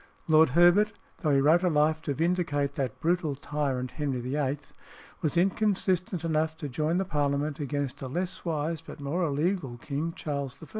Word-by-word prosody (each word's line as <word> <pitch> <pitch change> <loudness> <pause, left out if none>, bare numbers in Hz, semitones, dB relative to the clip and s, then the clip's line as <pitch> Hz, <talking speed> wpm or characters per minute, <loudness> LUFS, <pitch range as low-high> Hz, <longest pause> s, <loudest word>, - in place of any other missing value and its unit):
Lord 160 -1 +6
Herbert, 180 +5 +6 0.3
though 155 - 0
he 140 -1 +4
wrote 160 +5 +5
a 185 - +2
Life 155 0 +2
to 145 -3 -2
vindicate 160 -4 0
that 130 -5 -3
brutal 165 -3 0
tyrant 135 -3 -2
Henry 140 -4 -2
VIII., 135 +3 -1 0.6
was 160 +2 0
inconsistent 185 -2 +1
enough 160 0 0
to 155 -2 -5
join 155 +5 0
the 190 - 0
Parliament 145 -2 -1
against 145 -2 -3
a 135 - -4
less 180 +7 -3
wise 160 -1 -2
but - - -11
more 145 +6 -2
illegal 150 -3 -1
king, 150 +6 -3
Charles 140 -6 -4
I. - - -10
155 Hz, 170 wpm, -28 LUFS, 140-175 Hz, 0.6 s, Lord